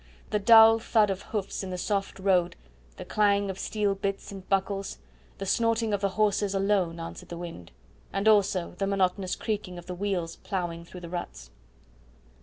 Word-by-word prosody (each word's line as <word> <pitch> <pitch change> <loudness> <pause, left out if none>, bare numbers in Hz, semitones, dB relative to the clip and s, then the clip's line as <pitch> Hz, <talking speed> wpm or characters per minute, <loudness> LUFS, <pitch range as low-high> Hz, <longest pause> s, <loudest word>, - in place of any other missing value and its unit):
The 210 - +2
dull 225 +1 +8
thud 215 -2 +3
of 190 0 -4
hoofs 205 -3 -4
in 190 - -5
the 180 - -4
soft 195 +1 -2
road, 185 -3 +2 0.4
the - - -7
clang 200 -2 +2
of 190 - -10
steel 210 -2 0
bits 195 0 -4
and 195 -1 -10
buckles, 195 0 -1 0.4
the 195 - -5
snorting 230 +1 +1
of 200 - 0
the 200 - +1
horses 205 0 +1
alone 195 -4 +1
answered 165 0 -8
the 170 - -6
wind, 165 - -8 0.4
and 195 +2 -1
also 200 -4 +3
the 195 - 0
monotonous 190 -1 0
creaking 205 -5 -4
of 175 - -9
the 180 - -5
wheels 180 -3 -2
ploughing 170 -3 -4
through 180 +1 -11
the 170 - -8
ruts. 65 - -6
195 Hz, 180 wpm, -27 LUFS, 180-205 Hz, 0.4 s, dull